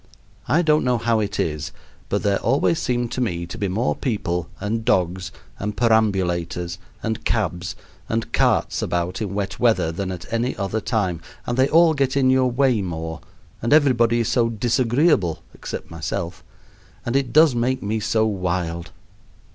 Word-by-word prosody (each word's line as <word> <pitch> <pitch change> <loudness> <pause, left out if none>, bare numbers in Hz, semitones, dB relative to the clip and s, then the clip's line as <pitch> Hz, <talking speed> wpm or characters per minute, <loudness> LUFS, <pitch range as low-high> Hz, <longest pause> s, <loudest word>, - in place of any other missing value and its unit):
I 170 +4 +3
don't 155 -1 +3
know 125 -1 +2
how 115 -1 +1
it 105 -1 -2
is, 75 -2 -2 0.4
but - - 0
there 100 -1 +2
always 140 +7 +2
seem 120 -1 0
to 125 - -3
me 85 -8 -1
to 85 - -8
be 100 - -2
more 105 +7 0
people, 90 - -2
and 110 +3 -2
dogs, 90 -1 0 0.3
and 105 +1 -4
perambulators, 90 -6 +1 0.2
and 110 -1 -2
cabs, 90 -5 -1 0.3
and 115 0 -2
carts - - +2
about 90 +2 -2
in 100 -2 -3
wet 100 +1 -3
weather 115 -9 +3
than 95 +3 -3
at 90 -2 -6
any 120 +3 0
other 100 +2 -2
time, 95 -8 -1 0.2
and 120 - -1
they 130 +2 +3
all 165 0 +5
get 140 -2 0
in 130 -1 +4
your 130 -1 +3
way 125 -3 +2
more, 80 -3 -5 0.4
and 115 +5 +2
everybody 120 -6 +4
is 115 - -1
so 115 -2 +2
disagreeable 115 - +1
except - - -7
myself 85 +1 -4 0.6
and 120 - -1
it 135 -3 +1
does 155 0 +6
make 125 +1 0
me 110 +2 -1
so 110 +1 +1
wild. 90 -4 -2
110 Hz, 170 wpm, -22 LUFS, 90-125 Hz, 0.6 s, does